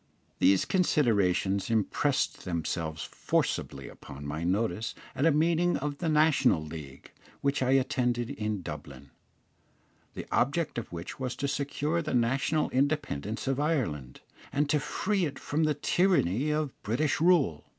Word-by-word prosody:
These 95 Hz, -1 st, +4 dB
considerations 100 Hz, -, +2 dB
impressed 115 Hz, +6 st, 0 dB
themselves 80 Hz, -2 st, -3 dB
forcibly -, -, -2 dB
upon 70 Hz, +1 st, -10 dB
my 75 Hz, +3 st, -4 dB
notice 100 Hz, +3 st, -1 dB, 0.2 s
at 145 Hz, -, +2 dB
a -, -, +5 dB
meeting 165 Hz, +3 st, +2 dB
of 145 Hz, -1 st, -4 dB
the 165 Hz, -, -1 dB
National 150 Hz, -, +3 dB
League, 75 Hz, -4 st, -9 dB, 0.3 s
which 140 Hz, -1 st, 0 dB
I 130 Hz, 0 st, +3 dB
attended 125 Hz, -2 st, +1 dB
in 105 Hz, -7 st, -3 dB
Dublin, 70 Hz, -4 st, -8 dB, 1.0 s
the -, -, -5 dB
object 145 Hz, +1 st, +1 dB
of 115 Hz, -, -9 dB
which 85 Hz, +7 st, -7 dB
was 130 Hz, -2 st, -3 dB
to 140 Hz, -, -2 dB
secure 145 Hz, +3 st, -1 dB
the 155 Hz, -4 st, -2 dB
national 135 Hz, +6 st, +1 dB
independence 130 Hz, -, -1 dB
of 135 Hz, 0 st, 0 dB
Ireland, 110 Hz, -, -1 dB, 0.3 s
and 145 Hz, +2 st, +1 dB
to 150 Hz, -, +3 dB
free 190 Hz, +6 st, 0 dB
it 140 Hz, -3 st, -5 dB
from 155 Hz, +2 st, 0 dB
the 150 Hz, -1 st, +1 dB
tyranny 150 Hz, -, +2 dB
of 150 Hz, -3 st, -1 dB
British 130 Hz, +9 st, 0 dB
rule. 160 Hz, -, +3 dB
135 Hz, 140 wpm, -29 LUFS, 95-150 Hz, 1.0 s, a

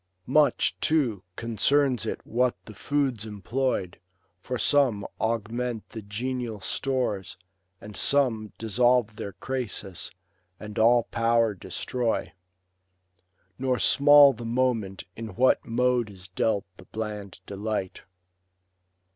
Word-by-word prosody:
Much, 150 Hz, +3 st, +3 dB
too, 130 Hz, -, +1 dB
concerns 120 Hz, +3 st, +1 dB
it -, -, -4 dB
what 125 Hz, +2 st, +1 dB
the 110 Hz, -, -10 dB
foods 135 Hz, -1 st, -1 dB
employed; 105 Hz, -2 st, -2 dB, 0.4 s
For 125 Hz, +7 st, -4 dB
some 125 Hz, -7 st, +2 dB
augment 115 Hz, +1 st, -2 dB
the 110 Hz, -, -7 dB
genial 115 Hz, +2 st, -4 dB
stores, 115 Hz, -1 st, -2 dB, 0.4 s
and 105 Hz, 0 st, -11 dB
some 115 Hz, -6 st, +2 dB
Dissolve 115 Hz, 0 st, +2 dB
their 100 Hz, -, -5 dB
crasis, 110 Hz, -8 st, -4 dB, 0.5 s
and 105 Hz, 0 st, -6 dB
all 120 Hz, +1 st, +5 dB
power 115 Hz, -1 st, +2 dB
destroy. 120 Hz, +5 st, -2 dB, 1.3 s
Nor 130 Hz, -1 st, +1 dB
small 145 Hz, +1 st, +7 dB
the 120 Hz, -, -9 dB
moment 115 Hz, -5 st, -1 dB
in 110 Hz, -4 st, -7 dB
what 130 Hz, +2 st, +3 dB
mode 125 Hz, -1 st, +1 dB
is 95 Hz, -2 st, -11 dB
dealt 100 Hz, +2 st, 0 dB
The 95 Hz, -, -14 dB
bland 105 Hz, -3 st, -6 dB
delight. 100 Hz, -1 st, -4 dB
115 Hz, 110 wpm, -26 LUFS, 105-125 Hz, 1.3 s, small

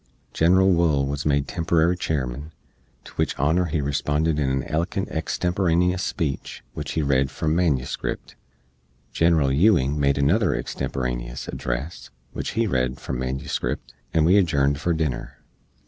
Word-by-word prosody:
Genral 95 Hz, +3 st, +4 dB
Wool 80 Hz, -5 st, +2 dB
wuz 70 Hz, +2 st, -3 dB
made 70 Hz, -1 st, +1 dB
temporary 85 Hz, 0 st, +1 dB
Chairman, 70 Hz, -3 st, -3 dB, 0.5 s
to -, -, -13 dB
wich -, -, 0 dB
honor 80 Hz, +6 st, +2 dB
he 80 Hz, -2 st, -1 dB
responded 75 Hz, +2 st, 0 dB
in 65 Hz, -2 st, 0 dB
a -, -, -10 dB
elokent 90 Hz, +5 st, -1 dB
extemporaneous 90 Hz, +2 st, 0 dB
speech, 75 Hz, -7 st, -3 dB
which -, -, -5 dB
he 80 Hz, -, 0 dB
read 70 Hz, -1 st, +2 dB
from 80 Hz, +3 st, -1 dB
manuscript. 75 Hz, -7 st, -1 dB, 0.8 s
General 80 Hz, -4 st, +3 dB
Ewing 75 Hz, -3 st, +3 dB
made 70 Hz, -1 st, +2 dB
another 85 Hz, +9 st, +2 dB
extemporaneous -, -, -4 dB
address, 65 Hz, +8 st, -4 dB, 0.2 s
which -, -, -4 dB
he 115 Hz, +1 st, +1 dB
read 65 Hz, -, -1 dB
from 60 Hz, -, -4 dB
manuscript, 65 Hz, -1 st, -3 dB, 0.2 s
and 80 Hz, -2 st, +3 dB
we 90 Hz, +5 st, +5 dB
adjourned 70 Hz, -6 st, +2 dB
for 85 Hz, -, 0 dB
dinner. 70 Hz, -6 st, -2 dB
75 Hz, 140 wpm, -24 LUFS, 70-85 Hz, 0.8 s, we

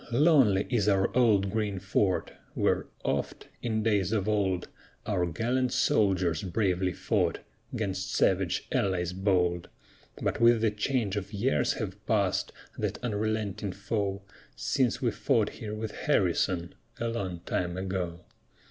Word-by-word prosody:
lonely 125 Hz, -, +4 dB
is 105 Hz, -4 st, +2 dB
our 95 Hz, +2 st, +2 dB
old 105 Hz, -6 st, +4 dB
green 105 Hz, -2 st, -1 dB
fort, 95 Hz, 0 st, 0 dB, 0.2 s
Where -, -, +1 dB, 0.2 s
oft, -, -, -2 dB
in 110 Hz, -2 st, -1 dB
days 100 Hz, -4 st, +2 dB
of 105 Hz, -3 st, 0 dB
old, 95 Hz, -4 st, 0 dB, 0.4 s
Our 95 Hz, -5 st, 0 dB
gallant 120 Hz, +9 st, 0 dB
soldiers 95 Hz, -6 st, +2 dB
bravely 95 Hz, -1 st, 0 dB
fought 80 Hz, -, 0 dB, 0.4 s
'Gainst 95 Hz, -2 st, -2 dB
savage 95 Hz, -1 st, +1 dB
allies 90 Hz, -2 st, 0 dB
bold; 90 Hz, -3 st, +1 dB, 0.5 s
But -, -, -1 dB
with 115 Hz, -1 st, +6 dB
the 110 Hz, -2 st, +3 dB
change 105 Hz, -1 st, -1 dB
of 100 Hz, +1 st, -5 dB
years 75 Hz, -8 st, +1 dB
have -, -, -5 dB
pass'd -, -, +1 dB, 0.3 s
That -, -, -1 dB
unrelenting 105 Hz, -3 st, -2 dB
foe, 100 Hz, -1 st, -2 dB, 0.3 s
Since 125 Hz, -4 st, 0 dB
we -, -, +2 dB
fought -, -, +1 dB
here 105 Hz, -1 st, -6 dB
with 110 Hz, 0 st, -4 dB
Harrison, 90 Hz, -, 0 dB, 0.3 s
A 115 Hz, -, -1 dB
long 95 Hz, -7 st, -3 dB
time 90 Hz, 0 st, -2 dB
ago. 95 Hz, -2 st, -3 dB
100 Hz, 135 wpm, -29 LUFS, 95-110 Hz, 0.5 s, with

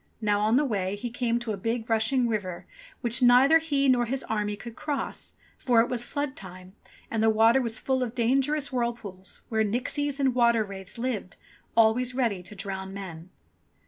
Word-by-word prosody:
Now, 210 Hz, -2 st, +1 dB
on 215 Hz, +2 st, +2 dB
the 295 Hz, -, +3 dB
way, 200 Hz, -6 st, -1 dB
he 235 Hz, +3 st, -5 dB
came 240 Hz, -2 st, 0 dB
to 240 Hz, -2 st, -4 dB
a -, -, -4 dB
big, 225 Hz, +3 st, -2 dB
rushing 230 Hz, +3 st, +2 dB
river, 200 Hz, -6 st, -3 dB, 0.4 s
which 235 Hz, +2 st, 0 dB
neither 255 Hz, +6 st, +6 dB
he 285 Hz, -4 st, 0 dB
nor 250 Hz, -2 st, +4 dB
his 265 Hz, +3 st, -2 dB
army 210 Hz, -1 st, -2 dB
could 230 Hz, +2 st, -10 dB
cross, 290 Hz, -2 st, -3 dB, 0.2 s
for 245 Hz, -3 st, +3 dB
it 235 Hz, +2 st, +3 dB
was 245 Hz, -2 st, -1 dB
flood 285 Hz, +1 st, -3 dB
time 185 Hz, 0 st, -11 dB, 0.4 s
and 225 Hz, -, 0 dB
the 225 Hz, -, +4 dB
water 225 Hz, +4 st, +4 dB
was 230 Hz, -1 st, 0 dB
full 260 Hz, 0 st, -1 dB
of 245 Hz, -1 st, -3 dB
dangerous 270 Hz, +5 st, +1 dB
whirlpools, 230 Hz, -6 st, -4 dB
where 220 Hz, -1 st, +1 dB
nixies 265 Hz, +6 st, -1 dB
and 265 Hz, -2 st, +2 dB
water 235 Hz, -2 st, +3 dB
wraiths 195 Hz, 0 st, -7 dB
lived, 230 Hz, -7 st, -3 dB, 0.4 s
always 235 Hz, +3 st, +3 dB
ready 230 Hz, -8 st, 0 dB
to 190 Hz, +4 st, -11 dB
drown 195 Hz, -1 st, -5 dB
men. 175 Hz, -3 st, -8 dB
230 Hz, 185 wpm, -27 LUFS, 205-255 Hz, 0.4 s, neither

